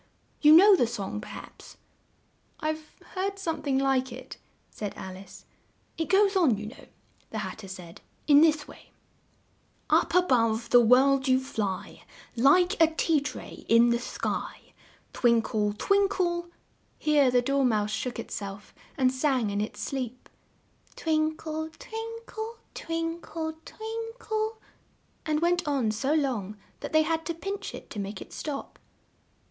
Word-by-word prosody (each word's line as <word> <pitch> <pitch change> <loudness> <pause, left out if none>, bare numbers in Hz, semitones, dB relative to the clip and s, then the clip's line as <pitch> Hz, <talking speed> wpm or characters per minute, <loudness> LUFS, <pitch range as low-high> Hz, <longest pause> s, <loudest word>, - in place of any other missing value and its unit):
You 300 0 +8
know 390 +5 +9
the 245 - +2
song, 210 -2 -4
per - - -10
haps?" - - -11 0.8
"I've 310 -1 -4 0.2
heard 390 +1 -2
some 325 -5 -3
thing 275 -2 0
like 265 -1 +1
it," 255 +2 -9 0.3
said 205 -2 -5
Alice. 190 0 -10 0.5
"It 325 - -3
goes 390 +1 +4
on, 310 - +4
you 210 - -6
know," 220 - -11 0.4
the 220 - -5
Hat 210 -1 -5
ter 200 - -9
said, 180 -3 -10 0.2
"in 290 -1 +7
this 310 -2 +3
way: - - -15 1.0
'Up - - +3
a 360 - +6
bove 230 -5 +1
the 245 - +8
world 265 +3 +5
you 260 0 +4
fly, 220 -8 -4 0.3
Like 350 - +4
a 325 - +8
tea 320 -1 +2
tray 290 - -7
in 235 +1 +6
the 235 - +2
sky, 245 - -4 0.4
Twin 235 -2 +3
kle, 210 -1 0
twin 400 - +3
kle 345 -3 -1 0.2
'" - - -40
Here 295 -3 +3
the 245 0 +3
Dor 275 +2 +1
mouse 215 -4 +1
shook 220 +2 -3
it - - -7
self 200 0 -6 0.2
and 255 -2 +3
sang 260 -5 +1
in 205 +1 -1
its 215 - -5
sleep, 255 -2 -4 0.7
"twin 310 -1 0
kle, 315 0 -4
twin 450 +1 -6
kle, 445 +1 -6 0.2
twin 330 +1 -3
kle, 320 0 -4
twin 450 +1 -6
kle 440 -1 -2 0.3
" - - -39
and 305 0 +1
went 345 -1 +1
on 265 -7 +1
so 265 +8 0
long 225 -9 -1 0.2
that - - -6
they 315 0 +5
had 325 +1 -1
to 335 - -2
pinch 395 +4 -5
it - - -12
to 210 - -5
make 200 0 -5
it - - -11
stop. 290 -3 -6
280 Hz, 165 wpm, -28 LUFS, 230-335 Hz, 1.0 s, know